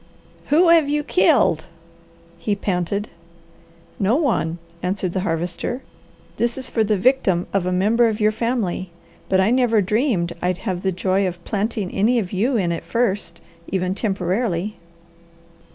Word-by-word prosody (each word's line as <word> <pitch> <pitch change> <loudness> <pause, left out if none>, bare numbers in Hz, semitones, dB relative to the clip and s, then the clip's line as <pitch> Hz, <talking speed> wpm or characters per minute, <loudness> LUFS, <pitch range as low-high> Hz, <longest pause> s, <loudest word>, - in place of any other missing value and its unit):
"Who 335 +4 +4
have 325 -4 +5
you 295 0 0
killed?" 180 - +3 0.7
he 205 +5 0
panted. 200 +1 -2 0.9
"No 205 +4 +2
one," 230 - 0 0.2
answered 185 -1 -2
the 190 - 0
Harvester. 180 +8 -2 0.5
"This 235 +1 0
is 260 -1 -1
for 225 - +1
the 210 -1 +1
victim 190 -6 +2
of 190 -2 +1
a - - 0
member 215 +6 +3
of 215 0 -3
your 215 0 +3
family, 220 -5 -2 0.4
but 190 - +3
I 190 +4 +3
never 245 -3 +3
dreamed 205 -4 +1
I'd 180 0 0
have 185 -1 -3
the 190 - 0
joy 190 +1 +1
of 175 -1 -7
planting 210 -2 -2
any 225 +5 +2
of 200 -5 -2
you 235 +7 +1
in 180 -5 0
it 170 - -3
first, 200 -7 -1 0.3
even 185 -1 -1
temporarily. 195 0 -1
200 Hz, 150 wpm, -21 LUFS, 180-230 Hz, 0.9 s, have